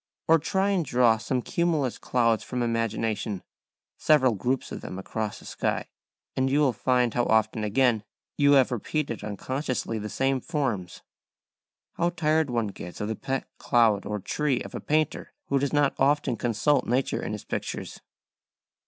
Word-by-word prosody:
Or 165 0 +6
try 190 +6 +1
and 185 -4 +1
draw 120 -4 +3
some 125 +2 -1
cumulus 165 -8 0
clouds 115 -3 +1
from 125 -1 -2
imagination, 115 -3 -1 0.6
several 130 -6 +4
groups 125 +6 -2
of - - -6
them 90 - -7
across 105 +2 -4
a - - -15
sky, - - -2 0.5
and 130 0 +1
you 140 +2 +2
will 140 -4 +3
find 125 +1 +1
how 120 -1 +1
often 110 0 +2
again 110 0 +2 0.3
you 145 -1 +4
have 135 -2 +5
repeated 125 +1 -2
unconsciously 125 +2 -3
the 105 0 -5
same 135 +1 0
forms. 125 - -3 0.9
How 170 +1 +2
tired 160 -3 +1
one 115 -3 0
gets 90 -3 -9
of 105 - -2
the 110 - -1
pet 135 +3 -3
cloud 110 -4 +3
or 105 - -2
tree 130 +6 -1
of - - -8
a - - -4
painter 155 0 -1 0.2
who 140 - +2
does 140 0 -1
not 145 -2 +3
often 140 -2 +2
consult 125 +5 +1
nature 130 +3 0
in - - -4
his 105 - -6
pictures. - - -5
125 Hz, 165 wpm, -26 LUFS, 110-145 Hz, 0.9 s, Or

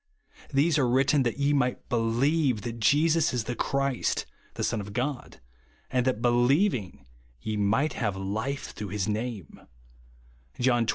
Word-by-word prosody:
These 150 +3 +3
are 130 - +3
written 135 +3 +3
that 120 -1 -1
ye 140 +1 +2
might 125 -3 +1
helieve 120 +2 +1
that 115 0 -5
Jesus 155 +6 +3
is 120 - 0
the 120 - -3
Christ, 135 -1 -1 0.3
the - - -3
Son 110 - 0
of 100 0 -8
God, 130 +2 -3 0.5
and 125 0 +1
that 115 -3 0
helieving, 120 - +2 0.3
ye 110 +8 -3
might 110 +9 +1
have 105 -6 -2
life 110 +9 -3
through 105 - -6
his 100 -1 -2
name," 110 - -4 1.0
(John 120 -2 +2
xx. - - -1
125 Hz, 155 wpm, -27 LUFS, 110-140 Hz, 1.0 s, These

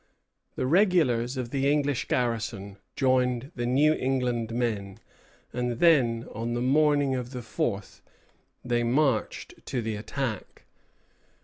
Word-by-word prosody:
The - - -1
regulars 140 - +2
of 125 -2 -4
the 140 0 +1
English 145 -3 0
garrison 110 -5 -2 0.2
joined 130 0 +1
the 120 -1 -2
New 145 +5 +4
England 125 -4 -1
men; 110 -5 -2 0.6
and 125 0 -1
then, 120 -5 +3
on 115 +2 -3
the - - -1
morning 145 +1 +3
of 125 0 -4
the 125 -1 -6
fourth, 105 -3 -3 0.6
they 120 -1 +1
marched 125 0 0
to 125 - -2
the 110 -2 -3
attack. 115 +2 -5
125 Hz, 125 wpm, -27 LUFS, 115-135 Hz, 0.6 s, New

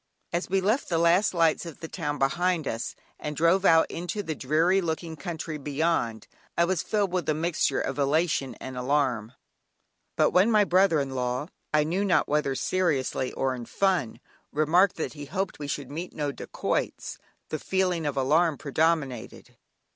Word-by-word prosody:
As 170 +1 -1
we 190 +1 +2
left 215 +8 +1
the 170 - +1
last 170 +4 +4
lights 165 -3 +2
of 165 -4 -9
the 165 - -6
town 145 -2 -3
behind 170 +3 +1
us, 115 +1 -3 0.2
and 150 0 -4
drove 170 +5 +3
out 165 -2 +6
into 180 +5 -4
the 160 - -3
dreary 160 +7 +2
looking 165 -1 -3
country 160 0 -5
beyond, 145 -5 -1 0.3
I 170 - +4
was 185 -2 0
filled 205 -4 0
with 180 -3 -1
a 155 - +2
mixture 160 -4 0
of 135 +2 -3
elation 145 -1 +1
and 130 0 -8
alarm, 125 -4 0 0.8
but - - +3
when 185 +5 +4
my 215 -2 +5
brother 185 -4 +3
in 140 -1 -2
law 125 +4 -2 0.2
(I 150 0 +4
knew 175 +6 -1
not 195 -3 +2
whether 150 -2 0
seriously 140 -7 0
or 135 -1 0
in 120 -2 -7
fun) 180 - 0 0.3
remarked 170 +6 +3
that 160 - -4
he 145 -1 -8
hoped 185 +6 -3
we 145 - -5
should 140 -1 -4
meet 170 +5 -5
no 145 -2 -2
dacoits, - - -3 0.3
the 155 - -3
feeling 180 -4 0
of 145 -1 -3
alarm 150 +4 +3
predominated. 150 -4 -1
160 Hz, 175 wpm, -27 LUFS, 140-180 Hz, 0.8 s, out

